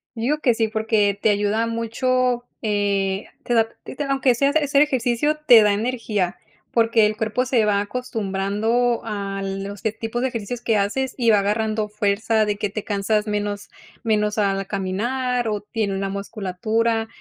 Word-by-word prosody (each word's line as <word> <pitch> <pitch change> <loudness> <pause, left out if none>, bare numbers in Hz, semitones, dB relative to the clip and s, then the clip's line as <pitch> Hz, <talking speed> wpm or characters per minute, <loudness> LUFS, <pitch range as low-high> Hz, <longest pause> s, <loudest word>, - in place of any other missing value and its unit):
Yo 225 - -5
digo 285 +6 +1
que 255 -5 +3
sí, 225 -1 +1
porque 215 -2 +1
te 220 - +3
ayuda 210 +2 +1
mucho, 245 +2 0 0.2
eh, 200 -2 0 0.2
te 240 - -1
da 230 - +6
a 225 - -1 0.2
ti - - -9
te 295 - -2
aunque 270 -2 +2
sea 275 +4 +2
hace 315 - +3
hacer 285 0 +3
ejercicio, 265 +1 +1
te 235 -3 +9
da 210 -1 +4
energía 215 -5 -1 0.3
porque 225 -2 +4
el 215 0 -3
cuerpo 220 +2 0
se 245 -4 +2
va 205 -1 +2
acostumbrando 225 +1 -1
a 200 -3 -4
los 195 +1 -5
que 220 - 0
tipos 225 +2 -4
de 260 - +1
ejercicios 235 0 -5
que 225 -2 +1
haces 245 +6 -1
y 235 -3 +3
va 210 - +5
agarrando 215 +1 0
fuerza 215 +1 +1
de 210 -1 -1
que 205 0 -2
te 210 +1 -5
cansas 210 +1 0
menos 205 -1 -3 0.3
menos 210 -2 +1
al 195 -1 +1
caminar 240 +6 -1
o 210 -2 -1
tiene 210 -2 -2
una 195 0 -2
musculatura, 215 +3 -1
220 Hz, 180 wpm, -22 LUFS, 205-240 Hz, 0.3 s, te